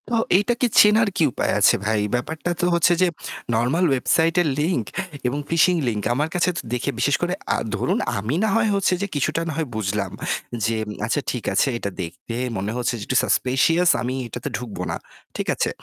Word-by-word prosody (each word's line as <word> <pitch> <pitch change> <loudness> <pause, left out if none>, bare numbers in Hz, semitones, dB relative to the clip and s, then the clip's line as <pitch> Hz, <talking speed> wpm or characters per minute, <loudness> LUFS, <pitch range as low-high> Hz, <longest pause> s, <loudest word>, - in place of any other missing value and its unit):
তো - - -4 0.2
এইটাকে 240 +5 +1
চেনার 215 +2 +6
কি 170 - +3
উপায় - - -1
আছে - - +6
ভাই? 110 0 +1 0.2
ব্যাপারটা 160 +8 -3
তো - - +2
হচ্ছে 170 +1 +4
যে 185 - +5 0.5
normal 125 +11 +2
website 160 +6 +2
এর 170 - +1
link 150 - 0 0.4
এবং 140 +4 -1
phishing 170 +1 +3
link 105 -3 -1
আমার 150 +5 0
কাছেতো 180 0 +1
দেখে 125 - -1
বিশেষ - - +3
করে, - - 0 0.2
আ - - 0 0.2
ধরুন - - 0 0.2
আমি 110 +8 -2
না 220 - +2
হয় 225 -1 +3
হচ্ছে 195 -1 +2
যে 200 - -1
কিছুটা 155 +3 0
না 160 - -2
হয় 160 -2 -1
বুঝলাম, 100 -2 -2 0.5
যে 115 0 0 0.3
আচ্ছা 135 +6 0
ঠিক 125 -4 -5
আছে 95 - +3
এটা 100 - -3
দেখতে 90 +7 -7 0.2
মনে 100 +3 -2
হচ্ছে 120 0 0
যে - - -6
একটু 125 - +1
suspicious 165 +7 +2
আমি 125 +1 -2
এটাতে 120 +5 -5
ঢুকবো 115 -3 -7
না। - - -2 0.4
ঠিক - - -3
আছে। - - 0
145 Hz, 195 wpm, -22 LUFS, 115-175 Hz, 0.5 s, চেনার